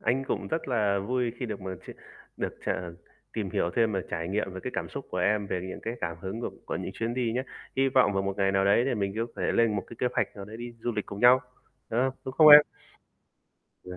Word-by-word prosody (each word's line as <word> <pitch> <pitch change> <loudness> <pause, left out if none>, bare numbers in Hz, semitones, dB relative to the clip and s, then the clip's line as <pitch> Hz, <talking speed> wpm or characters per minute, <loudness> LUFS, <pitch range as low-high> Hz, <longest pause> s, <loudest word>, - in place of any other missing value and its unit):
Anh 135 +2 +1
cũng - - -3
rất 160 -3 -2
là 105 -5 +2
vui 120 +3 -1
khi 125 - -4
được 105 -3 -5
mà 95 0 -5
chia - - -7 0.4
được - - -3
ch - - 0 0.6
tìm 105 -4 -3
hiểu 85 - 0
thêm 115 -2 +3
về 95 - 0
trải 85 +1 -3
nghiệm, 100 -1 -1
về 95 - -7
cái - - -3
cảm - - -3
xúc - - -7
của 90 - -4
em, 100 +2 +1
về 90 - -2
những - - -7
cái 115 +1 -3
cảm 85 -1 -3
hứng 95 +6 -5
của - - -3 0.2
của - - -2
những - - -5
chuyến 115 +1 -2
đi 120 -3 0
nhá. 125 +2 -1 0.3
Hy 135 0 +3
vọng 125 -6 +4
vào 95 0 0
một 100 0 -3
ngày 100 -1 +2
nào 95 0 +2
đấy 100 +4 +4
thì 135 - +1
mình 100 -2 -1
sẽ - - -1
có 95 - -5
thể - - +1
lên 115 -3 +3
một 95 - -3
cái 120 - -11
kế 125 - +1
hoạch - - -1
nào 100 - -7
đấy 110 +2 -9
đi 120 0 -7
du 120 - -2
lịch 105 -1 -3
cùng 100 0 -7
nhau, 125 +1 +7 0.5
đúng 115 - +1
không? 130 0 0
Đúng 130 - -4
không 155 -1 +8
em? 150 0 +13 1.2
Yeah. 90 0 -8
110 Hz, 275 wpm, -28 LUFS, 95-120 Hz, 1.2 s, em